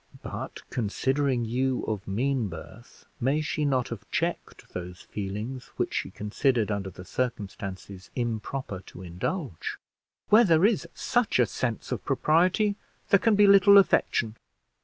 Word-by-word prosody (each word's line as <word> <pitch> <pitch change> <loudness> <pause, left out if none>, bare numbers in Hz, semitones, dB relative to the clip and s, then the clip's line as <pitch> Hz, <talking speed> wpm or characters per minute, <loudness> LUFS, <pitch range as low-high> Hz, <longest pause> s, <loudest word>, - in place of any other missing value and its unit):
"But, - - -7
considering 130 +3 0
you 130 +3 0
of 105 -2 -3
mean 120 +3 0
birth, 95 +7 -11
may 135 +5 +1
she 155 0 -1
not 130 -3 +1
have 105 -3 -8
checked 170 +1 -3
those 90 0 -6
feelings 105 +6 -5
which - - -1
she - - -2
considered 110 +1 0
under 100 -2 -2
the 90 0 -11
circumstances 100 -6 -5
improper 120 -2 -3
to 95 - -10
indulge?" 90 - -4 0.5
"Where 220 +3 +7
there 170 -3 +4
is 215 -1 +2
such 245 -4 +1
a 125 - +5
sense 110 +3 -3
of - - -2
propriety 185 +6 +2 0.3
there 200 - +6
can 225 +1 +3
be 205 0 +6
little 200 0 +8
affection." 115 - +3
125 Hz, 140 wpm, -27 LUFS, 105-155 Hz, 0.5 s, little